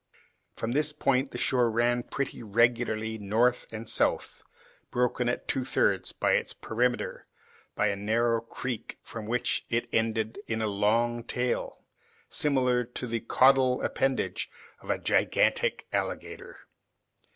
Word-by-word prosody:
From 115 - -3
this 150 +3 +1
point 135 -1 +1
the - - -7
shore 125 -3 +2
ran 120 +2 +2
pretty 140 +2 -4
regularly 110 0 +1
north 115 +5 +1
and 110 0 -7
south, 115 - 0 0.5
broken 125 0 +1
at 120 - -3
two 130 - 0
thirds 130 - +1
of - - +2
its - - +1
perimeter 125 +2 -1 0.5
by 105 - +2
a 100 - -1
narrow 115 +3 +1
creek, 115 0 -5
from 110 -2 -7
which 120 +1 0
it 115 0 0
ended 110 - 0
in 110 - -1
a 110 - 0
long 115 +4 +1
tail, 125 +1 -2 0.4
similar 125 -4 +2
to 125 +1 -5
the 115 -1 -2
caudal 130 +2 +4
appendage 135 -1 -1 0.3
of - - -13
a - - +2
gigantic - - +1
alligator. - - -4
120 Hz, 135 wpm, -28 LUFS, 110-125 Hz, 0.5 s, caudal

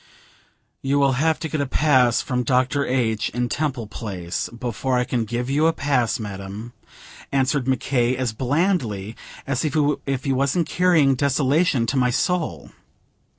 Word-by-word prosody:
"You 135 +1 +1
will 140 -1 +4
have 160 0 +2
to 160 - -2
get 155 -2 -2
a 140 - -1
pass 130 -4 +3
from 125 -2 -1
Dr. 130 +3 +1
H., 115 -4 0
in 125 0 0
Temple 135 -6 -2
Place, 95 -5 -5
before 120 +2 -2
I 125 - +2
can 120 -2 -1
give 120 +3 -3
you 145 +4 +2
a 165 - +2
pass, 135 -8 0
madam," 100 +2 -7 0.6
answered 135 0 +1
Mc 130 -1 +1
K., 125 -1 +1
as 125 -4 -1
blandly 125 - -1 0.3
as 135 -1 -1
if 145 -3 0
he 135 - 0
wasn't 140 +5 +1
carrying 170 -6 +3
desolation 140 +1 +2
to 135 - -1
my 125 -1 +3
soul. 175 +6 -1
130 Hz, 155 wpm, -22 LUFS, 120-145 Hz, 0.6 s, will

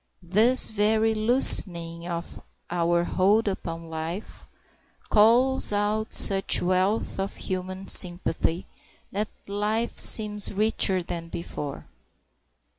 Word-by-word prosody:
This 220 +10 +3
very 220 +1 0
loosening 175 -7 +4
of 170 -1 -8 0.3
our 170 0 -1
hold 205 +5 0
upon 165 -4 -6
life 165 +5 -9 0.6
calls 235 +5 +2
out 210 +1 -3
such 195 -1 +3
wealth 185 +4 -2
of 195 +1 -5
human 185 +1 -7
sympathy 175 -1 +2 0.5
that 210 +2 -4 0.2
life 210 +3 -3
seems 210 -2 +2
richer 200 -3 +1
than 170 -1 -8
before. 150 -4 -8
195 Hz, 100 wpm, -23 LUFS, 175-215 Hz, 0.6 s, loosening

